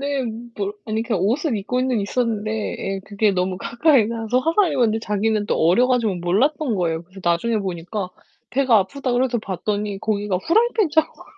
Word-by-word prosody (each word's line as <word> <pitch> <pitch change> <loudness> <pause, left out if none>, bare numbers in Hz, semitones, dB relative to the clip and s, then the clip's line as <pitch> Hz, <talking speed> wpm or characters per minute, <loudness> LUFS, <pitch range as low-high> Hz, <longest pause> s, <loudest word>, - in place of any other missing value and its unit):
네. 280 -1 -1 0.3
뭘 200 -1 -2
아니 220 0 -1
그니까 230 -3 -1
옷을 235 - 0
입고는 250 +3 0
있었는데 215 0 -1 0.3
예. 195 0 -3
그게 205 0 +1
너무 185 0 -1
가까이 235 0 +3
가서 230 +1 -1
화상을 330 +5 +2
입었는데 235 -5 +2
자기는 210 0 0
또 - - 0
어려 180 +10 +4
가지고 235 -6 +2
몰랐던 235 - +1
거예요. 165 -3 -1
그래서 185 +3 -14
나중에 175 +7 +1
보니까 185 +1 -4 0.4
배가 255 -4 +4
아프다 255 +6 -2
그래서 245 0 +1
봤더니 205 0 -3
거기가 205 -3 -1
프라이팬 430 - +2
자국이 315 +1 0
220 Hz, 410 characters per minute, -22 LUFS, 195-255 Hz, 0.4 s, 어려